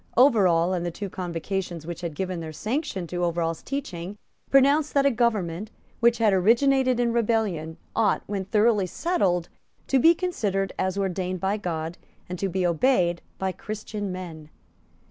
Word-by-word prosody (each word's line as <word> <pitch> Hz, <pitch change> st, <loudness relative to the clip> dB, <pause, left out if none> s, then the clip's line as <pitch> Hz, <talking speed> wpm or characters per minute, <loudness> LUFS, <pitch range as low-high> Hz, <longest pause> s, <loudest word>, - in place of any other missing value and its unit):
Overall, 190 Hz, -9 st, +5 dB
and 175 Hz, -2 st, -1 dB
the 175 Hz, -, -1 dB
two 195 Hz, +3 st, -6 dB
Convocations 175 Hz, -1 st, -4 dB
which 175 Hz, 0 st, -6 dB
had 170 Hz, -4 st, -4 dB
given 185 Hz, +1 st, -3 dB
their 160 Hz, -1 st, -6 dB
sanction 215 Hz, -, -3 dB
to 175 Hz, +1 st, -3 dB
Overall's 165 Hz, -1 st, -1 dB
teaching, 205 Hz, -9 st, -5 dB, 0.3 s
pronounced 280 Hz, +3 st, +4 dB
that 280 Hz, -1 st, +4 dB
a 280 Hz, -, +5 dB
government, 215 Hz, -5 st, 0 dB, 0.3 s
which 235 Hz, 0 st, +4 dB
had 220 Hz, -3 st, +3 dB
originated 255 Hz, +6 st, +3 dB
in 235 Hz, -1 st, +1 dB
rebellion, 210 Hz, -9 st, 0 dB, 0.2 s
ought, 215 Hz, -3 st, +2 dB
when 195 Hz, -2 st, -3 dB
thoroughly 210 Hz, -1 st, +3 dB
settled, 180 Hz, -, 0 dB, 0.4 s
to 270 Hz, -, +2 dB
be 330 Hz, +6 st, +6 dB
considered 205 Hz, -, -1 dB
as 185 Hz, +1 st, 0 dB
ordained 185 Hz, -1 st, -2 dB
by 195 Hz, +3 st, 0 dB
God 165 Hz, -3 st, -4 dB, 0.3 s
and 180 Hz, 0 st, -6 dB
to 195 Hz, -, -1 dB
be 185 Hz, 0 st, 0 dB
obeyed 175 Hz, -1 st, +2 dB, 0.2 s
by 190 Hz, 0 st, -1 dB
Christian 210 Hz, 0 st, -5 dB
men. 165 Hz, -4 st, -7 dB
190 Hz, 160 wpm, -25 LUFS, 175-235 Hz, 0.4 s, be